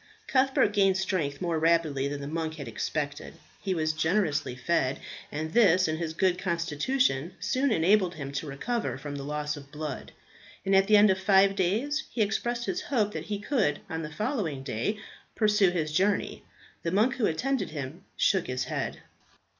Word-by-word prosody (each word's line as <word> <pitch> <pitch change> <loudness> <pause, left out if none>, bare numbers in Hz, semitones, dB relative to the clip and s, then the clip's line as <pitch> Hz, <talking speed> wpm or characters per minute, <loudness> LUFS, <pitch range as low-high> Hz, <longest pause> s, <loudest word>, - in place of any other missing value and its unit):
Cuthbert 265 -5 +2
gained 195 -2 +3
strength 180 -7 -1
more 170 -2 0
rapidly 160 -4 +2
than 140 0 -4
the 140 - -5
monk 160 +1 -3
had 145 -3 -7
expected. 150 -1 -4 0.3
He 190 -3 -1
was 155 -1 0
generously 160 -4 0
fed, 130 0 0 0.3
and 155 +2 -4
this 185 -6 +5
and 155 0 -2
his 165 -2 -3
good 180 0 +2
constitution 170 - 0
soon 255 +7 +1
enabled 185 0 +3
him 140 -3 -6
to 140 +2 -4
recover 140 - -2
from 145 +1 -6
the 140 - -5
loss 150 +1 -2
of 140 -1 -12
blood; 150 -2 -6 0.5
and 195 0 +3
at 195 0 +5
the 210 0 +7
end 205 -1 +6
of 190 - 0
five 195 0 +4
days 225 - 0
he 225 - +1
expressed 235 +3 -1
his 360 +6 -2
hope 235 - 0
that - - -5
he 210 - -3
could 205 - 0
on 160 0 -2
the 155 - -5
following 190 - -2
day 135 - -2 0.4
pursue 210 -3 +4
his 160 -4 -2
journey. 195 +5 +1 0.4
The 170 - -1
monk 215 +9 +2
who 230 - +2
attended 265 +12 -1
him 150 +4 -6
shook 190 -3 +2
his 125 0 -2
head. 130 - -4
175 Hz, 180 wpm, -28 LUFS, 150-210 Hz, 0.5 s, the